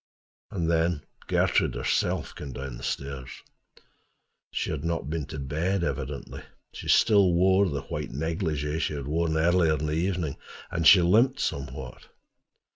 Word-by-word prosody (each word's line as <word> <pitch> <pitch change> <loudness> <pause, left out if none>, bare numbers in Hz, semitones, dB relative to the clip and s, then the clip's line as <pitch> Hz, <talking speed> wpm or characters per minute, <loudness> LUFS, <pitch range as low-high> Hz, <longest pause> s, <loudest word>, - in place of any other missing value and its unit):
And 85 -4 -2
then 80 -2 +1 0.2
Gertrude - - +2
herself - - -1
came 70 -3 -8
down 70 -2 -6
the - - -11
stairs. 70 -2 -4 1.2
She - - -2
had 75 -2 -4
not 85 -3 -2
been 80 -3 -3
to 75 - -7
bed, 80 +7 -1
evidently: 70 -5 -4 0.3
she - - -8
still 100 -5 +5
wore 95 +2 +4
the 70 -3 -3
white - - -5
negligée 80 0 -2
she 75 - -1
had 70 -2 -5
worn 80 +2 0
earlier 85 0 +3
in 75 +1 -3
the 75 - -1
evening, 85 -3 -1 0.3
and 85 -1 +2
she 90 0 +9
limped 120 +10 +4
somewhat. 65 - -4
80 Hz, 150 wpm, -27 LUFS, 70-90 Hz, 1.2 s, she